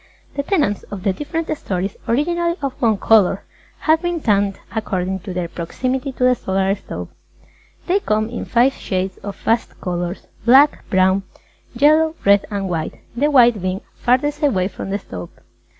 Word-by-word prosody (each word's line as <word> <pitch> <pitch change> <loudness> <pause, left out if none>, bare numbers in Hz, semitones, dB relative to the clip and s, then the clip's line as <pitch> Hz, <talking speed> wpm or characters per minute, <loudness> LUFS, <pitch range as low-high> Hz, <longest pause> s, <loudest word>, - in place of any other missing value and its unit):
The 280 - -1
tenants 285 - 0
of 195 -3 -7
the 195 - +2
different 310 - -3
stories, 190 -6 -3
originally 340 +7 +1
of 275 -2 -1
one 225 -4 +3
colour, 200 -2 +3 0.4
have 315 0 +3
been 350 -1 -1
tanned 200 -6 +1 0.2
according 190 -3 -2
to 190 +1 -7
their 180 -1 -2
proximity 255 - -3
to 250 - -3
the 250 0 +6
Solar 195 -4 0
Stove. 200 - -7 0.8
They 370 +3 +2
come 215 - 0
in 235 +1 -5
five 245 +3 +3
shades 185 -4 -3
of 200 -1 -6
fast 230 +3 -1
colours 175 0 -3 0.2
Black, 275 +5 +5
Brown, 185 +1 +3 0.5
Yellow, 310 +4 +4
Red 200 0 +5
and 200 -2 -2
White, 165 -3 -3 0.2
the 290 +5 +2
White 240 -7 +5
being 185 +1 -2
farthest 290 +5 +1
away 195 -11 +2
from 190 - -7
the 200 - 0
Stove. 90 - -8
215 Hz, 165 wpm, -20 LUFS, 190-280 Hz, 0.8 s, the